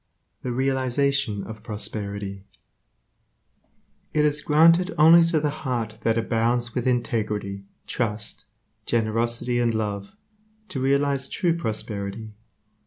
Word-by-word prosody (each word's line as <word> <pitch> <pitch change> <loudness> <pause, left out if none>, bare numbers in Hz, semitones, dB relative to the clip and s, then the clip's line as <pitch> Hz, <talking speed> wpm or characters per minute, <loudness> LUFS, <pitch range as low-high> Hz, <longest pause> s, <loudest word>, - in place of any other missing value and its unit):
7. 125 - -4
The 120 - -4
realization 130 -4 0
of 110 -1 -9
prosperity 100 -3 -5 1.7
It 150 0 +4
is 150 0 +1
granted 165 +5 +4
only 165 +3 +8
to 165 -2 +2
the 150 -1 0
heart 115 -6 -3
that 115 +1 +1
abounds 115 +1 0
with 125 0 -1
integrity, 105 -5 -1 0.2
trust, 110 -2 -3 0.4
generosity 115 +2 0
and 120 -2 +1
love 100 -2 -3 0.5
to 135 - -4
realize 140 0 +1
true 170 -2 +1
prosperity. 110 -5 -4
120 Hz, 110 wpm, -24 LUFS, 110-140 Hz, 1.7 s, only